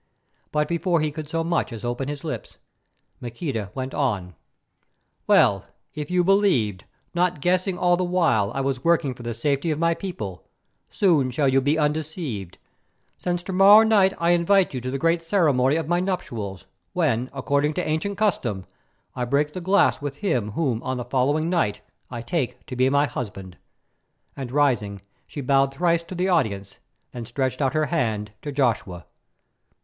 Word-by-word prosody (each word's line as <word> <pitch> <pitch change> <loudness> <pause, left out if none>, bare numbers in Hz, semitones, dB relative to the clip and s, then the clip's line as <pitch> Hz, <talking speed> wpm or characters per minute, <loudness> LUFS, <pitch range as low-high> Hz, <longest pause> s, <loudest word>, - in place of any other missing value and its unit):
But 150 0 +1
before 170 +1 +1
he 155 -1 0
could 150 0 -7
so 165 0 -1
much 170 -4 -1
as 115 0 -7
open 120 +2 -2
his 145 -1 -5
lips 155 - -6 0.6
Maqueda 120 - -4
went 130 0 -4
on: 100 -11 -1 0.9
"Well, - - +4 0.3
if 150 -1 -5
you 180 0 +2
believed, 170 - +2 0.3
not 175 -2 +1
guessing 180 +3 +1
all 175 -1 +3
the 185 - -1
while 165 - +2
I 135 - 0
was 135 -1 -2
working 165 -5 +2
for 125 - -13
the 120 -1 -4
safety 140 +6 0
of 155 - 0
my 170 +1 +2
people, 110 - -6 0.5
soon 160 -10 +2
shall 140 +3 0
you 135 0 +3
be 145 +4 +1
undeceived, 150 - -3 0.6
since 175 -1 -2
to 190 - -5
morrow 200 +4 +8
night 200 -4 +4
I 170 +1 +2
invite 175 +1 +3
you 130 - -3
to 130 - -4
the 135 - -2
great 165 +4 +1
ceremony 150 -7 +2
of 160 -2 -2
my 175 +1 +2
nuptials, 115 - -4 0.3
when, 130 -8 0
according 140 +2 0
to - - 0
the - - -4
ancient 160 +6 -1
custom, 120 - 0 0.5
I 125 - -2
break 145 +4 0
the 185 - -5
glass 190 -2 +3
with 145 -1 -4
him 125 - -1
whom 130 -6 -1
on 130 0 -3
the 125 - -4
following 140 +5 +1
night 170 - 0 0.3
I 120 -2 -6
take 125 -4 -3
to 135 - -7
be 130 +1 +3
my 140 +1 +3
husband," 100 -8 -6 0.8
and 130 -3 -6
rising, 115 -9 +1 0.2
she 145 - -6
bowed 135 +1 +2
thrice 170 +1 +2
to 185 - -8
the 180 +2 0
audience, 100 - -1 0.3
then 120 -2 -7
stretched 130 +2 -2
out 135 +2 +1
her 155 0 +2
hand 110 -9 -1
to 145 - -5
Joshua. 110 -10 -1
145 Hz, 175 wpm, -24 LUFS, 125-170 Hz, 0.9 s, morrow